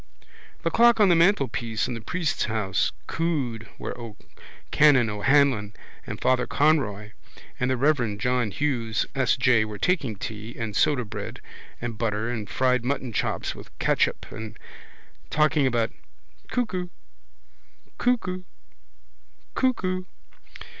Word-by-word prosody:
The 165 - 0
clock 235 +2 +5
on 205 -3 +6
the 175 - +6
mantelpiece 130 - +2
in 125 - -3
the 115 - -6
priest's 165 +6 -1
house 105 -3 0
cooed 135 -9 -2
where - - -5 0.8
Canon 135 -7 +5
O'Hanlon 110 -1 +2 0.3
and - - -5
Father 125 -1 +2
Conroy 115 -9 +1 0.5
and 125 - +1
the 130 - +1
reverend 120 -7 +1
John 125 0 +1
Hughes 115 -3 -1
S. 130 -4 +2
J. 125 -4 +4
were 105 -1 -6
taking 140 - 0
tea 110 +3 -7
and 110 -3 -4
sodabread 125 -7 0 0.4
and 115 -2 -5
butter 115 0 -1
and 110 -4 -4
fried 125 -2 +2
mutton 130 -2 -2
chops - - -1
with - - -12
catsup - - +1
and 110 0 -7 0.7
talking 150 -2 +3
about 115 -2 +1 0.6
Cuckoo 200 -8 -1 1.1
Cuckoo 210 -7 0 1.1
Cuckoo. 185 -8 0
125 Hz, 120 wpm, -25 LUFS, 110-155 Hz, 1.1 s, on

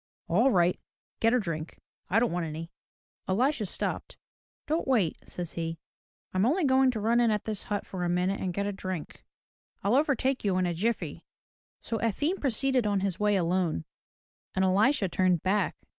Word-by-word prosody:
"All 225 +10 +4
right. 180 -6 +3 0.4
Get 225 +2 +4
a - - +4
drink. 165 -6 -5 0.3
I 200 - +3
don't 235 +1 +3
want 175 -1 -1
any." 160 +2 -6 0.6
Elisha 235 +3 +1
stopped. - - -4 0.5
"Don't 315 +3 -1
wait," 220 -12 +2
says 175 -2 -5
he. 165 0 -3 0.6
"I'm 185 +1 +2
only 315 - +2
going 265 0 +4
to 235 -4 -1
run 230 +3 +2
in 235 -1 +4
at 210 -2 0
this 215 -2 -3
hut 205 -1 -2
for 185 -2 -5
a 175 - 0
minute 180 +3 +1
and 185 - -1
get 200 +3 -2
a 205 - -1
drink. 185 -4 -6 0.6
I'll 200 +3 +2
overtake 275 -1 +2
you 195 -3 +1
in 185 - +2
a 175 - 0
jiffy." 220 +8 -2 0.6
So 225 - -2
Efim 290 - 0
proceeded 265 -2 +1
on 200 -2 +1
his 195 -3 -1
way 210 0 +3
alone, 175 - 0 0.7
and 190 0 +3
Elisha 205 +5 +3
turned 180 -2 +1
back. 200 +2 +1
200 Hz, 180 wpm, -29 LUFS, 180-240 Hz, 0.7 s, All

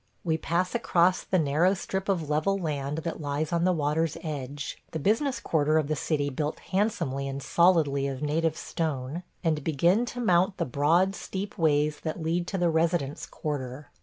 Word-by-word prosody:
We 165 -4 +1
pass 170 +3 -1
across 185 -6 +3
the 185 - 0
narrow 165 +5 +3
strip 190 +1 -4
of 170 -6 0
level 155 +7 +1
land 150 -4 -2
that 165 -1 -3
lies 150 +3 -2
on 170 0 +2
the 185 - +4
water's 155 0 0
edge 145 -2 -5
– - - -36
the - - -1
business 230 - +1
quarter 155 -7 +2
of 155 -2 0
the 155 - +1
city 145 -1 -1
built 150 +3 -2
handsomely 180 - -1
and 135 0 -4
solidly 150 -4 +3
of 135 0 -4
native 160 +2 0
stone 150 -1 -3
– - - -41
and 155 -4 +1
begin 170 - +2
to 245 - -6
mount 190 -3 +3
the - - 0
broad 160 +9 +2
steep 195 0 -5
ways 150 -2 +2
that 160 +1 -4
lead 170 +2 -1
to 195 - -2
the 175 -2 +2
residence 160 -3 0
quarter. 145 -2 -5
160 Hz, 190 wpm, -27 LUFS, 145-180 Hz, -, the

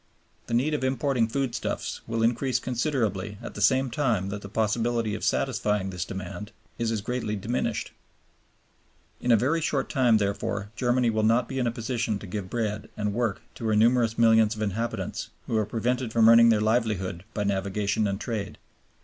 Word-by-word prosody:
The 115 - -1
need 140 +6 +2
of 150 - -1
importing 130 -2 +1
foodstuffs 130 0 -3
will 115 0 -1
increase 120 +2 +1
considerably 115 - -1
at - - -8
the 105 - -6
same 130 +5 +3
time 115 -8 0
that 105 0 -5
the 100 - -9
possibility 115 +1 0
of - - -5
satisfying 105 -6 0
this 90 -1 -3
demand 95 +3 -6 0.3
is 115 -1 0
as 110 -2 -1
greatly 120 -1 -2
diminished. 115 +2 -2 1.3
In 125 - +1
a 115 - +7
very 140 +9 +1
short 145 -4 -1
time, 120 -4 +4
therefore, 100 0 -2
Germany 120 0 +2
will 110 0 0
not 115 +2 +3
be 135 -1 -3
in 125 - +1
a - - +1
position 115 -2 -2
to 105 - -10
give 95 0 -5
bread 110 -2 -2
and 105 -1 -1
work 115 -3 -1
to 115 - -5
her 110 - +2
numerous 115 +1 +3
millions 110 -1 +5
of 110 - -3
inhabitants, 110 +3 -3 0.2
who - - -2
are 110 -2 +1
prevented 125 +1 -1
from 115 -1 +5
earning 115 0 +8
their 110 -2 +4
livelihood 105 -6 0
by 105 - 0
navigation 100 +1 0
and 100 0 -2
trade. 105 -3 -4
115 Hz, 185 wpm, -26 LUFS, 105-120 Hz, 1.3 s, earning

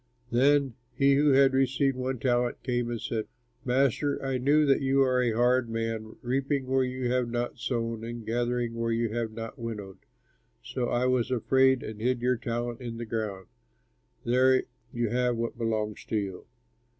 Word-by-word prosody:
"Then 135 +1 +3 0.2
he 140 +1 +4
who 145 +2 +4
had 135 0 +5
received 135 +1 +2
one 130 +1 -2
talent 120 0 0
came 120 -2 -1
and 120 -1 -3
said, 110 -1 -3 0.4
'Master, 135 +3 +1
I 135 -1 -1
knew 145 +4 +4
that 140 0 +3
you 135 0 +3
are 130 -1 +2
a 120 -2 +1
hard 125 +1 +2
man, 115 -1 -3
reaping 135 +2 0
where 130 0 +2
you 125 -1 -2
have 125 -1 +1
not 120 +1 -3
sown 115 -2 -2
and 115 -1 -6
gathering 120 0 -1
where 115 0 -1
you 115 0 0
have 115 -1 -2
not 115 +4 -7
winnowed; 105 -5 -6 0.6
so 125 - -3
I 120 +1 +1
was 125 -2 +1
afraid 130 +1 +3
and 110 -1 -7
hid 125 +1 +1
your 125 +1 +2
talent 120 +1 -3
in 120 -2 -5
the 120 - -5
ground. 110 -4 -4 0.8
There 130 +2 +4 0.3
you 120 -2 -1
have 125 +1 +1
what 115 +1 -3
belongs 110 -2 -2
to 110 - -1
you.' 95 -3 -4
120 Hz, 175 wpm, -28 LUFS, 115-130 Hz, 0.8 s, had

